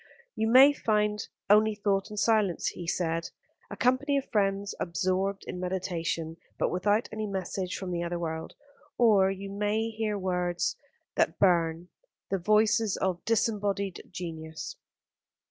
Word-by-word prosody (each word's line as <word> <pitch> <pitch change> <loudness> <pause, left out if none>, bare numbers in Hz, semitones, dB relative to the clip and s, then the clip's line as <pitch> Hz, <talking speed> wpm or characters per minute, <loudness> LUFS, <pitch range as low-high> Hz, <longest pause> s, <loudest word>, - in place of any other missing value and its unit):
"You 220 - 0
may 265 +5 +8
find 210 -4 0 0.2
only 215 +1 +5
thought 200 -1 0
and 210 - -8
silence," 215 -6 +2
he 175 - -8
said, 165 -1 -1 0.4
"a - - -7
company 260 +3 +2
of 275 - -4
friends 200 -2 0
absorbed 185 +3 -1
in 180 - -6
meditation, 170 -3 -3 0.2
but - - 0
without 205 +5 +1
any 215 -1 -3
message 190 -1 -3
from 190 -2 -5
the 170 -1 -1
other 175 0 -2
world; 160 -1 -4 0.4
or 205 -5 +5
you 195 +1 -5
may 210 +2 0
hear 220 -2 -2
words 180 -2 -1 0.4
that - - +2
burn, 170 -2 +2 0.4
the 195 - +1
voices 215 +2 +3
of 185 -2 -1
disembodied 205 -4 0
genius. 160 -3 -6
195 Hz, 140 wpm, -28 LUFS, 175-215 Hz, 0.4 s, may